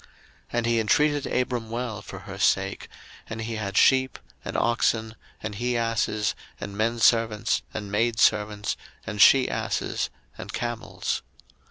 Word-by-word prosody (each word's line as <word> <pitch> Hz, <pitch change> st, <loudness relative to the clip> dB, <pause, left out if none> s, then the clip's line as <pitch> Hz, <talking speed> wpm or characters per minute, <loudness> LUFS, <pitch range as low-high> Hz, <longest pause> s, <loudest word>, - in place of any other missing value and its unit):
01:012:016 -, -, -24 dB, 0.4 s
And 120 Hz, -1 st, +1 dB
he 115 Hz, 0 st, +2 dB
entreated 145 Hz, +6 st, +2 dB
Abram 125 Hz, -3 st, -1 dB
well 115 Hz, -3 st, -3 dB
for 95 Hz, -1 st, -9 dB
her 95 Hz, +1 st, -9 dB
sake: 95 Hz, 0 st, +1 dB, 0.4 s
and 115 Hz, -, -5 dB
he 115 Hz, 0 st, -3 dB
had 100 Hz, -2 st, -3 dB
sheep, 130 Hz, 0 st, +4 dB, 0.3 s
and -, -, -4 dB
oxen, 115 Hz, -1 st, +1 dB, 0.3 s
and 110 Hz, -1 st, -3 dB
he 120 Hz, +3 st, -1 dB
asses, 115 Hz, -2 st, 0 dB, 0.3 s
and 100 Hz, 0 st, -6 dB
menservants, 115 Hz, 0 st, +2 dB
and 100 Hz, -1 st, -6 dB
maidservants, 105 Hz, -2 st, +2 dB, 0.3 s
and 105 Hz, -2 st, -2 dB
she 135 Hz, +3 st, +7 dB
asses, -, -, -2 dB, 0.3 s
and -, -, -6 dB
camels. 120 Hz, -1 st, -3 dB
115 Hz, 140 wpm, -26 LUFS, 105-120 Hz, 0.4 s, she